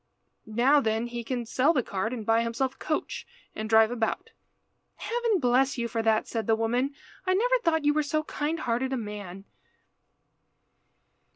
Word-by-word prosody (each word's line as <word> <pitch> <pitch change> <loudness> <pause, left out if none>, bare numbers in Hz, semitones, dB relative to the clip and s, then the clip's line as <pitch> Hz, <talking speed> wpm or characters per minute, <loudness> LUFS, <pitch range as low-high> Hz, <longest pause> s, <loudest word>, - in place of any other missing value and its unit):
Now 245 +7 +4
then 220 -1 0
he 240 0 -5
can 240 0 -3
sell 260 +7 +2
the 260 -6 +1
cart, 200 +3 -2
and 230 -4 -5
buy 225 +1 +3
himself 235 +3 -1
a - - -27
coach, 310 - -3 0.3
and 215 0 -5
drive 220 0 +5
about." 230 -2 -2 0.6
"Heaven 465 -3 0
bless 260 +1 +2
you 235 -1 -1
for 230 0 -2
that," 220 -1 +2
said 225 -3 -3
the 225 - +4
woman. 245 +5 0 0.3
"I 370 - +3
never - - +3
thought 320 -2 +1
you 295 - +4
were 305 - +2
so 310 +1 -1
kind 310 +2 -3
hearted 255 +2 -1
a - - 0
man." 205 -4 -7
245 Hz, 175 wpm, -27 LUFS, 225-290 Hz, 0.6 s, drive